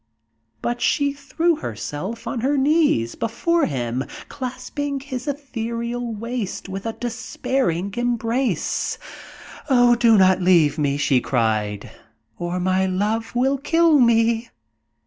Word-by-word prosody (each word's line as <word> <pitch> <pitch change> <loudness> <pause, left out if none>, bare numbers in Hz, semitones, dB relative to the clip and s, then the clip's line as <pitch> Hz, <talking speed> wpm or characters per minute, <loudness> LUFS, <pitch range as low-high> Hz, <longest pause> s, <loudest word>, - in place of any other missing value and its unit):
But 240 0 -2
she 285 -1 +2
threw 300 +4 0
herself 195 - -5
on 245 - -3
her 275 +5 +1
knees 280 - +2
before 320 +9 0
him, 125 -2 -2 0.3
clasping 280 +2 -4
his 265 -1 -6
ethereal 235 -4 -3
waist 230 -3 -4
with 195 +3 -5
a 225 - -2
despairing 230 -5 -2
embrace. 240 +1 -1 0.7
"Oh, 245 -2 +5
do 235 -2 +5
not 190 -1 +5
leave 165 -4 +4
me," 140 -1 +1
she 135 -3 +2
cried, 110 -3 -1 0.5
"or 175 +1 -2
my 185 +1 +1
love 210 +5 -1
will 265 +3 +2
kill 325 +1 +4
me!" 230 -1 +3
230 Hz, 120 wpm, -22 LUFS, 185-265 Hz, 0.7 s, Oh